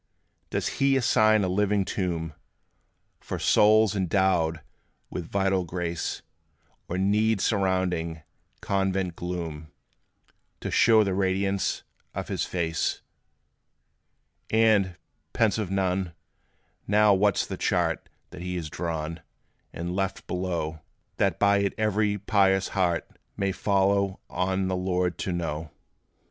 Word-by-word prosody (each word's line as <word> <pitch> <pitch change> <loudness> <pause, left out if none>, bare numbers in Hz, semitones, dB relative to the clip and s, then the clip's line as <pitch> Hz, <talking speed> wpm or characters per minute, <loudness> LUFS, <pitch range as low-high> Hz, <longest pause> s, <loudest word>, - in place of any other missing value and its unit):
Does - - -1
He 135 0 +4
assign 110 -3 +4
a - - +1
living 100 +1 +1
tomb 85 -5 -2 0.9
For - - -5
souls, 110 0 +4
endowed 90 -4 +1 0.5
with 85 -2 -5
vital 95 -1 +1
grace; 85 -1 -3 0.7
Or 90 - -2
need 105 +3 +2
surrounding 95 -6 0 0.4
convent 95 -2 0
gloom, 80 -4 -5 0.9
To - - -4
show 110 -2 +5
the 100 -2 -1
radiance 95 +1 0 0.3
of - - -4
his - - -1
face? 80 -2 -2 1.5
And, 110 -5 +3 0.4
pensive 105 -3 +1
Nun, 95 -2 -1 0.7
now 105 0 +5
what 100 0 +3
's - - +1
the - - -5
chart - - 0 0.2
That - - -9
he 90 0 -4
has 80 -3 -4
drawn, 80 -1 -4 0.5
and 85 +2 -4
left 95 0 -2
below, 85 -4 -3 0.4
That 95 -4 +1
by 100 0 +4
it 100 0 0
every 105 -1 +1
pious 95 -1 +2
heart 90 -4 0 0.3
May 100 -1 0
follow 100 0 +1
on 95 +1 0
the 95 - 0
Lord 90 -2 -1
to 95 - -2
know? 80 -2 -3
95 Hz, 120 wpm, -26 LUFS, 85-100 Hz, 1.5 s, show